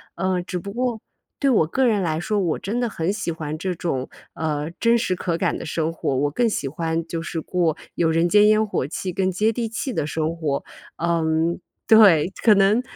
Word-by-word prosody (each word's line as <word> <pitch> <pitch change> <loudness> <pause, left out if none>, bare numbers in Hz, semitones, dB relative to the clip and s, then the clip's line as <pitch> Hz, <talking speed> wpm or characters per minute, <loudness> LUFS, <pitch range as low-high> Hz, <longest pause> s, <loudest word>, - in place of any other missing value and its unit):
呃， 185 0 0
只 180 0 -4
不 200 +3 -7
过， 240 -1 -2 0.4
对 275 - +2
我 220 -10 +4
个 260 +10 +1
人 210 -3 +2
来 160 -2 -1
说， 205 +5 -1
我 175 -5 0
真 220 +5 -3
的 245 - +1
很 170 -2 -1
喜 205 -4 -3
欢 155 -1 -5
这 180 +3 -2
种， 135 -7 -3 0.3
呃， 150 -1 -2
真 235 0 +4
实 185 -6 0
可 175 -2 -2
感 - - 0
的 - - -7
生 160 +1 -1
活， 150 -4 -2
我 145 +3 +1
更 235 +9 +1
喜 175 -9 -2
欢 165 +3 -2
就 165 -1 -4
是 165 -1 -4
过 170 -2 0 0.2
有 165 -1 +2
人 165 +2 +2
间 210 +2 +6
烟 215 0 +4
火 165 - -1
气、 180 +3 -4
更 185 +1 0
接 210 +5 +1
地 230 0 -2
气 230 +4 -4
的 145 - -1
生 160 +2 -2
活。 150 -4 -2 0.3
嗯 165 0 0 0.3
对， 195 -6 +6
可 220 - +7
能 200 +4 +4
175 Hz, 230 characters per minute, -22 LUFS, 160-210 Hz, 0.4 s, 可